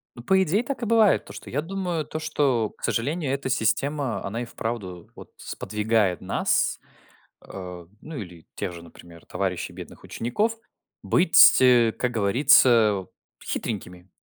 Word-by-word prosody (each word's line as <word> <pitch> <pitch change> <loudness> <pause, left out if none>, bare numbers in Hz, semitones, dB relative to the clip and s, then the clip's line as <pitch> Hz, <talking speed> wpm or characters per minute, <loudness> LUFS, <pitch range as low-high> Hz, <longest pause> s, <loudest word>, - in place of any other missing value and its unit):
Ну, 120 - -11
по 190 +7 +3
идее, 190 +6 +1
так 265 0 -5
и - - -2
бывает. 220 -3 +3
То, 100 - -11
что 105 - -10
я 145 - -1
думаю, 175 -2 -3
то 155 - -6
что, 135 -8 0
к - - -23
сожалению, 145 +4 -1
эта 140 -1 -3
система, 130 -1 -1
она 115 +5 -4
и - - -6
вправду 110 -7 -6
вот - - -13
сподвигает 105 -3 -1
нас, - - 0 0.7
э, 90 -3 -9
ну, 160 0 -9
или 90 -6 -9
тех - - -4
же, 85 - -10
например, 85 0 -15
товарищей 95 -2 -3
бедных - - -11
учеников, 210 - -2 0.5
быть, 175 -1 +6
э, 120 -3 +5
как 125 - -2
говорится, 110 - +4 0.4
хитренькими. 90 -5 -5
120 Hz, 150 wpm, -24 LUFS, 100-150 Hz, 0.7 s, быть